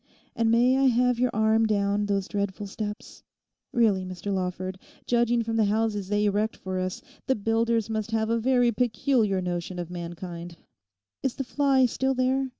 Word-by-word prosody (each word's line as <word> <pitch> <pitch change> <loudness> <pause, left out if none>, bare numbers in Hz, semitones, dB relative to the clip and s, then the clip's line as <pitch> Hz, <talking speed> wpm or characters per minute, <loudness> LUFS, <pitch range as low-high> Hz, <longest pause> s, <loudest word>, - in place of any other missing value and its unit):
And 230 -2 +2
may 245 +3 +4
I 275 - +3
have 250 0 +2
your 250 0 +3
arm 220 +1 +3
down 205 -1 +1
those 200 -1 0
dreadful 200 0 -3
steps? 210 +1 -6 0.5
Really, 215 -6 +2
Mr 185 +2 -4
Lawford, 185 0 -3 0.3
judging 240 -1 +2
from 225 0 -2
the 220 - +4
houses 210 -1 0
they 205 0 +1
erect 210 +2 0
for 185 -1 -4
us, 185 0 -3 0.2
the 265 - +3
builders 225 +1 +1
must 220 -1 -3
have 225 0 0
a 230 - +2
very 245 0 +3
peculiar 220 -3 +1
notion 175 0 -3
of 175 -1 -5
mankind. 175 0 -7 0.6
Is 265 - -1
the 270 - -3
fly 270 0 +3
still 265 +2 0
there? 260 +1 +1
220 Hz, 170 wpm, -26 LUFS, 195-240 Hz, 0.6 s, may